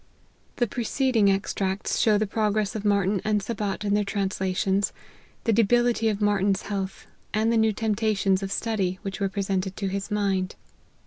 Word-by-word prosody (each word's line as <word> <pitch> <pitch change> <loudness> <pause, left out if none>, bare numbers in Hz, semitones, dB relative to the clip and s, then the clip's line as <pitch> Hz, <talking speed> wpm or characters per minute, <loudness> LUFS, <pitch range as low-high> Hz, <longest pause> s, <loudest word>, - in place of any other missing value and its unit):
The 240 - +2
preceding 235 -1 +1
extracts 195 0 -1
show 215 -2 +4
the 215 - +1
progress 210 0 0
of 215 - -3
Martyn 200 -2 +2
and 210 -1 +2
Sabat 205 -1 -3
in 200 - +1
their 210 0 +3
translations, 195 0 0 0.5
the 225 - +2
debility 235 +1 +3
of 205 -2 -2
Martyn's 205 -1 +2
health, 195 -2 -4 0.3
and 220 +2 +2
the - - +2
new 220 -1 +4
temptations 210 -3 +1
of 195 0 -4
study 200 -4 -1
which 195 -1 -5
were 195 -1 0
presented 190 -1 -2
to 195 -2 -2
his 195 +1 -3
mind. 195 -3 0
205 Hz, 165 wpm, -25 LUFS, 195-215 Hz, 0.5 s, show